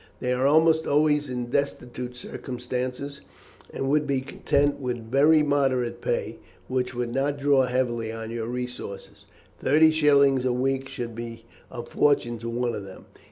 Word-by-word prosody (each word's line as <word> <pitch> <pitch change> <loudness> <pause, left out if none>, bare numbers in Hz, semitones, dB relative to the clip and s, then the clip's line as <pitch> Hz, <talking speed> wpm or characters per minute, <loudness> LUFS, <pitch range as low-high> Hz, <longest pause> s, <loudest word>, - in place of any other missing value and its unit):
They 125 0 0
are 130 +2 +2
almost 160 +2 +4
always 150 -1 +2
in 125 -1 -4
destitute 125 -3 -2
circumstances, 125 +3 -5 0.5
and 135 - -3
would 150 +1 +2
be 135 -2 0
content 140 +1 0
with 120 -4 -4
very 150 +3 +5
moderate 135 -4 0
pay, - - -2 0.3
which 130 -1 -2
would 120 -1 -2
not 140 +1 0
draw 140 -1 +3
very 125 - -5
heavily 120 -3 0
on 115 0 -6
your 115 -1 -4
resources. 125 -5 -6 0.3
Thirty 160 +3 +5
shillings 140 -4 +4
a 130 -1 +1
week 135 +1 -1
would 120 -1 -4
be 115 0 -8 0.2
a 120 - -6
fortune 120 -3 +1
to 115 +1 -5
one 120 0 -1
of 105 - -5
them. 95 -1 -12
130 Hz, 160 wpm, -25 LUFS, 120-140 Hz, 0.5 s, very